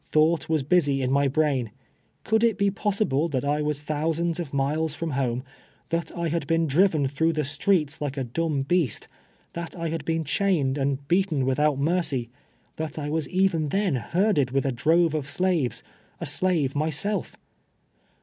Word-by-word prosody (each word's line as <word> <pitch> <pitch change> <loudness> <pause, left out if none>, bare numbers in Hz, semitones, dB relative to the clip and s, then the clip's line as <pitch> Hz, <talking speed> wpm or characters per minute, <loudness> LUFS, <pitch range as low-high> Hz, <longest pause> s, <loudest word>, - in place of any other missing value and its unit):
Thought 155 +2 +2
was 155 -3 +1
busy 145 -3 +2
in 130 - 0
my 140 +1 +3
brain. 135 -4 +1 0.5
Could 220 +1 +2
it 225 -3 +2
l)e 200 0 +3
possible 195 -7 0
that 140 -2 -2
I 145 +1 +1
was 150 -1 -2
thousands 160 +3 -1
of 165 -5 -4
miles 150 +3 0
from 165 -1 -3
home 130 -2 -1 0.2
— - - -35
that 165 0 -1
I 170 0 -1
luid 165 -2 -2
been 165 +1 +2
driven 155 -1 +3
through 160 +5 +1
the 155 -1 0
streets 150 +1 0
like 145 -1 -3
a 135 - -1
dumb 145 +3 -1
beast 155 - 0 0.2
— - - -36
• - - -43
that 170 -1 -5
I 165 -2 -3
had 165 +1 -3
been 165 0 -1
chained 145 -5 +1
and 140 0 -1
beaten 170 -6 +1
without 145 +2 +2
mercy 140 -6 0 0.2
— - - -39
that 160 -1 -4
I 145 -1 -3
was 160 0 -1
even 185 -5 +1
then 195 0 +1
herded 150 - +1
with 135 +2 0
a 135 - +1
drove 160 +6 +2
of 145 -3 -3
slaves, 160 -12 0 0.4
a - - -4
slave 165 -8 0
myself? 160 +8 -1
155 Hz, 190 wpm, -25 LUFS, 140-170 Hz, 0.5 s, my